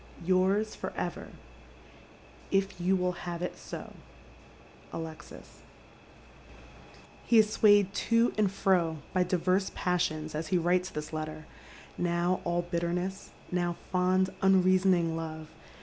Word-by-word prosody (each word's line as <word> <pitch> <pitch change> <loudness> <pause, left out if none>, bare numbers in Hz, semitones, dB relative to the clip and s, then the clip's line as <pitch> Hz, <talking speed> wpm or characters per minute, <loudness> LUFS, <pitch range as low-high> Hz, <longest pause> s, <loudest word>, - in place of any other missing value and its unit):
— - - -13
Yours 195 +4 +2
for - - -5
ever, - - -4 1.2
if 195 -2 0
you 185 +2 +3
will 180 -1 +1 0.2
have 170 0 -4
it 180 - -3
so, - - -9 0.6
— - - -24
Alexis," 160 -2 -9 1.6
He 235 - +3
is 215 -1 +5
swayed 205 -3 +4 0.2
to 230 +1 +4
and 210 -3 +2
fro 180 -5 +1 0.2
by 185 - +2
diverse 185 +2 +1
passions 155 -3 -1
as 155 +1 -3
he 185 - +2
writes 180 +2 +1
this 150 +1 -6
letter, 155 0 -5 0.5
now 175 +1 0
all 175 0 0
bitterness, 175 +2 -3 0.2
now 175 -1 0 0.2
fond 185 +1 +2
unreasoning 185 -3 +3
love. 160 -1 -6
180 Hz, 125 wpm, -29 LUFS, 170-190 Hz, 1.6 s, is